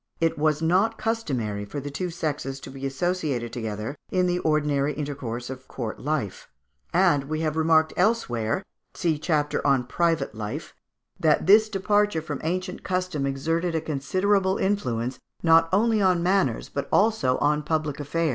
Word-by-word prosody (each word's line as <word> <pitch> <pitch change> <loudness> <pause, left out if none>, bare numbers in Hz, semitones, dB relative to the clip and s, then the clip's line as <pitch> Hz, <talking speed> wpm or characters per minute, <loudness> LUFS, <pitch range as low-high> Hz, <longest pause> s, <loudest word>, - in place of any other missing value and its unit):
it 165 -1 +2
was 155 +1 +1
not 195 +7 +2
customary 135 - -2
for 105 +8 -5
the 145 +1 -6
two 180 +6 -3
sexes 145 -5 -3
to - - -9
be 135 0 -4
associated 140 -6 -2
together 110 +2 -4
in 185 -1 +2
the 180 0 +1
ordinary 150 -3 +1
intercourse 135 -5 -4
of 130 0 -8
court 115 -4 -5
life; 145 -9 -3 0.4
and 170 -6 +3
we 155 +2 -3
have 155 -1 -1 0.4
elsewhere 180 - +1
remarked 190 - -3 0.3
(see 160 -4 0
chapter 150 -2 0
on 135 -3 +3
Private 160 -1 0
Life) 110 +8 -6 0.5
that 155 -2 +3
this 215 +3 +6
departure 205 -3 +1
from 145 -3 -5
ancient 185 +3 -3
custom 185 -6 -1
exerted 165 +5 -1
a - - +2
considerable 185 +7 +1
influence, 125 - -1 0.2
not 165 0 +5
only 220 +2 +3
on 180 -3 +3
manners, 180 - +1
but 140 - -4
also 200 - +3
on 150 +1 +2
public 155 -1 -2
affairs. 160 +3 0
155 Hz, 155 wpm, -25 LUFS, 135-185 Hz, 0.5 s, this